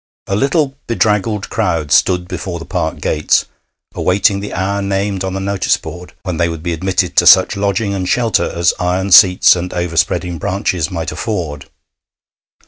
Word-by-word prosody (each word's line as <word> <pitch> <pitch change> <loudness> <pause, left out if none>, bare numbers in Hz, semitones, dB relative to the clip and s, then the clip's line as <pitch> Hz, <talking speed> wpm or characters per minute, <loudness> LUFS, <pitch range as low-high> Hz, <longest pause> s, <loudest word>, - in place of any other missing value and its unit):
A 95 - -2
little, 140 - 0
bedraggled 105 -2 0
crowd 85 -9 -1
stood 90 +5 +2
before 90 -1 -5
the 85 - -9
park - - -3
gates, 75 0 +1 0.5
awaiting 100 +2 +1
the 105 - -6
hour 100 +2 -2
named 100 0 -2
on 95 0 -3
the - - -2
notice 100 0 0
board 90 0 -10
when 90 -4 -4
they 85 0 +1
would 80 -1 -7
be 85 -1 -2
admitted 95 +3 -1
to - - +5
such 95 +3 +6
lodging 100 +1 -1
and 95 -2 -3
shelter 115 -5 +1
as 85 0 +1
iron 90 +2 -1
seats 95 -4 +7
and 90 +1 -4
overspreading 85 0 -1
branches 90 -2 -2
might 85 -1 -4
afford. 80 -10 -5
95 Hz, 165 wpm, -15 LUFS, 85-100 Hz, 0.5 s, seats